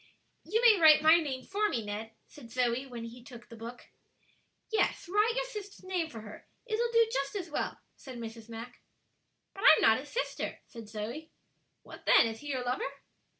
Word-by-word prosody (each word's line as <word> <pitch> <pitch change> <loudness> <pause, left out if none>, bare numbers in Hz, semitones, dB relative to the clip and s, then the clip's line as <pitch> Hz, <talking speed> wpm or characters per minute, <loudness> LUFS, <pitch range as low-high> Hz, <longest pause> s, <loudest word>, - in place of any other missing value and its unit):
"You 435 +6 0
may 440 -5 +7
write 310 -1 +8
my 315 +2 +8
name 270 -6 -3
for 415 +6 0
me, 230 -4 -2
Ned," 215 +2 -5
said 245 -6 -14
Zoe, 250 +2 0
when 240 -3 -7
he 235 +1 -9
took 240 -1 -13
the 230 - -10
book. 230 +2 -9 0.9
"Yes, 440 - +1
write 420 +5 +2
your - - 0
sister's 415 -6 -9
name 360 -3 -1
for 225 -5 -9
her; 215 -1 -12 0.2
it'll 470 +1 -1
do 460 -1 +5
just 275 +7 -2
as 355 -5 -4
well," - - -3 0.2
said 260 -3 -10
Mrs. 230 -1 -8
Mack. 230 +2 -9 0.7
"But 390 - -9
I'm - - +8
not - - +5
his - - -10
sister," - - -3
said 230 -3 -11
Zoe. 235 +9 -6 0.5
"What, - - -13
then? - - +7
is 225 -1 -4
he 295 - -10
your 260 -3 -2
lover?" 250 +2 -1
265 Hz, 195 wpm, -31 LUFS, -, 0.9 s, write